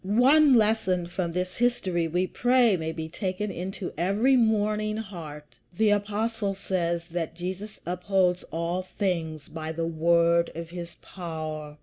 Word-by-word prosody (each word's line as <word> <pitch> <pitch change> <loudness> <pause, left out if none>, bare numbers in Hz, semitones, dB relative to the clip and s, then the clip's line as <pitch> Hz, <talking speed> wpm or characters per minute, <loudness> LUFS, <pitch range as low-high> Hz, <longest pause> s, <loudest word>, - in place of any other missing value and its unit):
One 260 +8 +5
lesson 210 -5 +2
from 175 0 -3
this 180 +1 -3
history 190 -8 +1
we 180 +3 +1
pray 245 0 +3
may 160 -2 -3
be 160 -1 -5
taken 190 +4 -3
into 190 +1 -5
every 205 +9 +3
mourning 215 -2 +2
heart. 160 -8 -8 0.2
The 220 -1 +4
Apostle 205 0 0
says 170 -3 -2
that 165 -1 -3
Jesus 190 +4 -6
upholds 180 0 +1
all 170 +3 -2 0.2
things 160 -6 -1
by 160 0 -5
the 165 +1 -2
word 170 +1 +3
of 165 0 -6
his 175 -1 -7
power. 155 -4 -6
180 Hz, 140 wpm, -27 LUFS, 170-210 Hz, 0.2 s, One